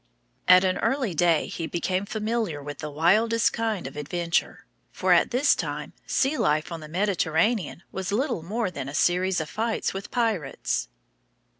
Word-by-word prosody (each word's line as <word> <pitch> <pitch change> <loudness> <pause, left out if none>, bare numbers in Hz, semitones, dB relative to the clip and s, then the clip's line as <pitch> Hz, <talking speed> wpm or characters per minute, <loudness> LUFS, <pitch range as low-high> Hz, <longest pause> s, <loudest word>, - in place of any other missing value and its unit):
At 185 0 +8
an 185 -1 +1
early 260 -8 0
day 165 -1 +3
he 165 - -5
became 185 +4 -1
familiar 215 -8 -2
with 145 0 -7
the 150 - -4
wildest 215 +10 +3
kind 225 - -2
of 135 - -7
adventure, 165 +3 -2 0.3
for - - +2
at - - +4
this 260 +4 +4
time - - -4
sea 280 +3 +1
life 155 +4 +1
on 165 - -4
the 155 - -9
Mediterranean 180 +1 0
was 190 0 -4
little 230 - 0
more 205 +4 -2
than 140 -5 -5
a 140 - -6
series 180 +2 +2
of 155 - -3
fights 225 +6 -2
with 195 +1 -6
pirates. 210 - -1
185 Hz, 165 wpm, -26 LUFS, 160-220 Hz, 0.3 s, At